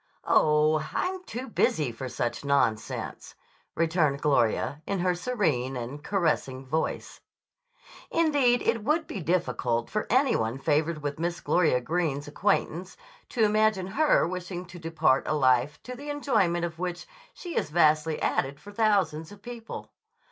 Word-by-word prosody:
"Oh, 155 0 +4 0.2
I'm 370 0 -1
too 255 +3 -6
busy 150 - +1
for 125 +3 -6
such 120 +1 -3
nonsense," 140 -6 -1 0.4
returned 160 -4 +1
Gloria 140 +1 +1
in 200 -3 -1
her 180 0 +2
serene 160 - -1
and 130 +5 -6
caressing 150 -8 -1
voice. 155 +5 -3 0.9
Indeed, 285 -7 +3
it 230 - 0
would 310 +6 +1
be 200 - -6
difficult 140 -9 0
for 215 +2 -1
any 260 +2 +3
one 110 +3 -1
favored 155 +2 0
with 145 +1 -3
Miss 170 +1 -2
Gloria 165 -8 +2
Greene's 150 0 -1
acquaintance 180 +1 -1 0.3
to 230 - +1
imagine 215 -2 +2
her 295 - +3
wishing 180 0 -5
to 175 -1 -10
depart 160 -4 +1
a 155 - +1
life 130 0 +3
to 250 - -7
the 285 +4 -8
enjoyment 215 -13 +1
of 170 -1 -7
which 175 -1 -3 0.3
she 350 -2 -7
has - - -1
vastly 155 -1 +3
added 140 +1 0
for 205 - -12
thousands 200 -7 +1
of 205 - -14
people. 240 -2 -8
170 Hz, 150 wpm, -27 LUFS, 145-210 Hz, 0.9 s, Oh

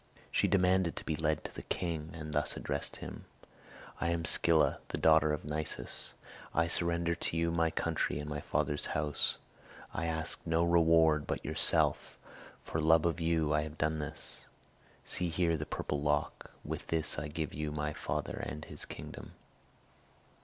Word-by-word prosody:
She - - +2
demanded 90 -2 +3
to - - -7
be 80 - -1
led 75 -1 0
to - - -7
the - - -7
king, 80 -3 -3
and 75 -2 -6
thus 75 -2 0
addressed - - -2
him: - - -8 0.7
"I 85 - 0
am 85 -1 -1
Scylla, 80 0 +4
the - - -4
daughter 80 -1 +5
of 75 - -3
Nisus. 75 -4 -3 0.4
I 80 - +4
surrender 85 0 +1
to 85 -1 -3
you 85 0 +1
my 85 -1 +2
country 80 -2 -1
and 75 0 -5
my 75 0 -3
father's 75 0 -1
house. 75 -2 +1 0.6
I 85 - -2
ask 80 -1 0
no 80 +1 +2
reward 80 -3 +4
but - - -3
yourself; - - +4 0.5
for 80 - -2
love 80 +1 +5
of 85 0 0
you 80 -2 +1
I 75 - +3
have 75 0 -7
done 80 0 0
it. 75 - -4 0.6
See 90 -1 0
here 85 0 +1
the 75 -1 -4
purple 75 -1 -3
lock! 75 0 -1 0.2
With - - -5
this 80 -3 +2
I 75 - -4
give 80 0 -4
you 75 0 -3
my 75 0 -2
father - - -3
and 75 0 -5
his - - -5
kingdom." - - -9
80 Hz, 170 wpm, -32 LUFS, 75-85 Hz, 0.7 s, daughter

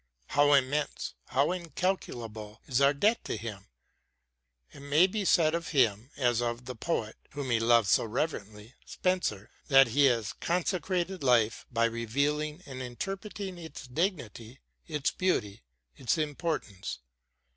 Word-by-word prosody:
How 145 0 +4
immense, 140 +2 +1
how 140 +5 +2
incalculable 120 - -3
is 130 +1 0
our 140 0 +6
debt 210 +11 +2
to - - -3
him! 105 -3 -7 1.0
It - - -13
may 145 +5 +4
be 205 +2 -2
said 160 -3 +4
of 170 0 -2
him 120 -5 +2
as 120 -4 +2
of 120 +1 -2
the 125 - -5
poet 115 -3 -3 0.2
whom 140 -3 -3
he 115 - +3
loved 115 -1 +4
so - - +4
reverently, 110 -3 -4
Spenser, 180 - -1 0.2
that 135 -3 +7
he 140 +5 +4
has 115 -6 +2
consecrated 180 +1 -1
life 120 -5 +2
by 115 -1 +2
revealing 145 +8 -1
and 130 -2 -7
interpret 195 - -5
ing 190 -3 -5
its 160 -4 -9
dignity, 125 - -3 0.3
its 155 0 0
beauty, 110 - -1 0.3
its 125 +5 0
importance. 150 - -3
135 Hz, 140 wpm, -29 LUFS, 115-165 Hz, 1.0 s, that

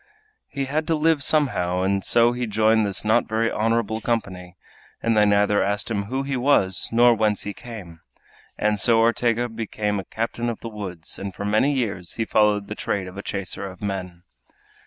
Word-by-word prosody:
He 140 -1 -3
had 155 +3 -2
to 165 - +2
live 155 -1 +2
somehow, 95 - +1
and 95 0 0
so 120 0 +4
he 120 0 -3
joined 110 0 +2
this 100 +1 -3
not 110 - +3
very 115 +1 0
honorable 110 0 0
company; 95 -6 -3 0.5
they 110 -2 +3
neither 105 0 +3
asked 105 +3 -1
him 100 -2 -1
who 130 +6 -2
he 135 0 -3
was 125 -8 +2
nor 120 +1 +5
whence 105 -2 0
he 100 - -5
came, 100 -10 -10 0.6
and 105 -1 +1
so 115 +3 +4
Ortega 115 +1 +2
became 110 -2 -3
a - - -5
captain 115 +1 -3
of 115 - -5
the 115 - -6
woods, 95 -6 -6
and 100 -1 -6
for 100 - -5
many 110 +7 +2
years 100 -9 -3
he 115 - -1
followed 105 -2 +2
the - - -5
trade 100 -3 -3
of 90 - -10
a 100 - -5
chaser 100 0 -4
of 90 - -13
men. 90 -3 -5
110 Hz, 190 wpm, -23 LUFS, 100-115 Hz, 0.6 s, nor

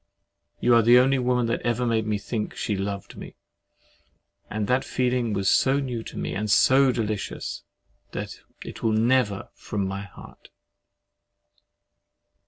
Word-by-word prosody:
You 120 - +3
are 115 - +6
the 120 +2 +6
only 130 +2 +4
woman 125 -1 +1
that 115 - -1
ever 120 +1 0
made 110 -2 0
me 105 -1 0
think 105 +1 -4
she 105 - -2
loved 100 0 -5
me, - - -10 1.1
and 105 0 -2
that 125 +5 +1
feeling 125 -2 0
was 95 -2 -1
so 135 +5 +3
new 125 -4 -3
to - - -9
me, - - -3
and 105 +1 -3
so 130 +5 +5
delicious, 110 -4 -4 0.5
that - - -6 0.3
it - - -9
"will 110 -1 +1
never 115 -2 +1
from 100 -2 -4
my 95 +1 -4
heart." 100 -1 -13
115 Hz, 150 wpm, -25 LUFS, 105-125 Hz, 1.1 s, are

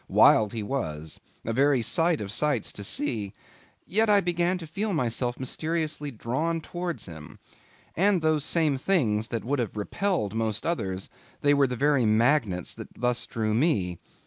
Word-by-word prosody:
Wild 105 -2 +5
he 110 -2 -3
was; 80 - -4 0.3
a 115 - -1
very 135 0 +3
sight 165 +2 +1
of 100 -1 -5
sights 140 -1 0
to 100 - -6
see; 105 -3 -2 0.5
yet 220 +3 +2
I 205 -1 +6
began 175 0 +1
to 170 - -8
feel 195 +6 -2
myself 120 -4 -1
mysteriously 155 +2 -2
drawn 140 +8 -2
towards 175 +1 -5
him. 80 -3 -10 0.6
And 190 -1 +3
those 155 -2 +2
same 150 -4 +1
things 115 - +1
that 115 -2 -4
would 140 +2 0
have 115 -3 -3
repelled 140 - -1
most 110 -1 -1
others, 95 - -2 0.3
they 145 0 +4
were 140 -1 +4
the 125 - -3
very 140 -2 +2
magnets 110 - +2
that - - -9
thus 125 -1 0
drew 110 -2 -1
me. 110 - +1
135 Hz, 165 wpm, -27 LUFS, 110-165 Hz, 0.6 s, I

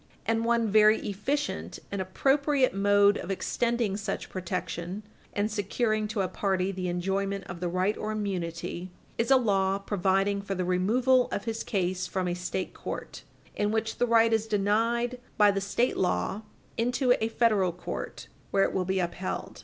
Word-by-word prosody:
And 225 0 +1
one 235 -1 +2
very 215 +1 +6
efficient 275 +9 -2
and 200 -1 -2
appropriate 270 +7 +2
mode 205 +1 +4
of - - -7
extending 230 +2 0
such 205 0 -4
protection 185 +1 -4 0.3
and 205 +2 -1
securing 215 +1 0
to 210 -1 -1
a 190 - 0
party 190 0 0
the 185 -1 -4
enjoyment 195 +2 -1
of 175 -1 -8
the 175 0 -2
right 185 +4 +1
or 215 - -3
immunity 180 -4 -3 0.3
is 230 - +1
a 270 - +7
law 195 -5 +2
providing 195 0 +1
for 200 -1 -4
the 185 -1 -1
removal 240 +8 +3
of 200 - -2
his 225 -1 -3
case 185 -2 -1
from 185 -1 -2
a 175 - 0
State 180 +1 -3
court, - - -6 0.3
in 205 - +1
which 220 +1 -1
the 245 - +3
right 230 -1 +4
is 220 0 +1
denied 230 +4 +1 0.2
by 210 -1 +6
the 195 0 -1
State 235 +5 0
law, 190 +2 0 0.4
into 245 +2 +3
a - - +2
Federal 215 -6 +2
court, 180 - -6 0.2
where 195 - +3
it - - 0
will 185 - 0
be 190 +1 0
upheld. 180 +1 -4
200 Hz, 170 wpm, -28 LUFS, 185-225 Hz, 0.4 s, a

